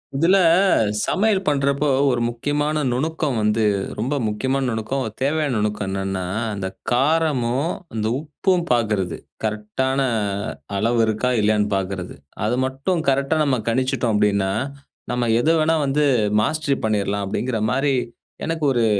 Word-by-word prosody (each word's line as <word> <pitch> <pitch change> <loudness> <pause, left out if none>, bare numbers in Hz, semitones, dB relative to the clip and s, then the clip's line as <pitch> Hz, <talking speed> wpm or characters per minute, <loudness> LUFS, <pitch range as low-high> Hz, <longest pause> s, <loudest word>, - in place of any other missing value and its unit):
இதுல 170 +7 +4 0.7
சமையல் 200 -1 +1
பண்றப்போ 140 0 +1 0.2
ஒரு 120 -2 0
முக்கியமான 145 +5 -1
நுணுக்கம் 150 -1 -1
வந்து 105 +1 +2 0.4
ரொம்ப 130 +6 -1
முக்கியமான 130 +6 -1
நுணுக்கம், 115 +4 -2 0.2
தேவையான 145 0 +1
நுணுக்கம் 105 -1 -1
என்னன்னா, 95 -1 -2 0.3
அந்த 95 -1 -3 0.2
காரமும், 140 0 +1 0.2
அந்த 110 -1 -2
உப்பும் 170 +4 0
பாக்குறது. 105 -7 0 0.3
கரெக்ட்டான 110 +6 -1 0.8
அளவு 115 +3 +1
இருக்கா, 110 +4 0
இல்லையான்னு 105 0 +2
பாக்குறது. 95 -1 -3 0.3
அது 120 +3 0
மட்டும் 140 +7 -1
கரெக்ட்டா 140 +3 +1
நம்ம 130 -4 +1
கணிச்சிட்டோம் 125 -1 0
அப்படின்னா, 100 -2 +2 0.6
நம்ம 120 -1 0
எத 160 - +1
வேணா 160 +1 +2
வந்து, 145 +2 +2 0.4
மாஸ்டரி 145 +2 0
பண்ணிறலாம் 100 -1 0
அப்படின்கிற 120 +3 -2
மாரி, 135 +1 +1 0.5
எனக்கு 165 -1 -3
ஒரு 120 -2 +2
130 Hz, 125 wpm, -22 LUFS, 105-145 Hz, 0.8 s, இதுல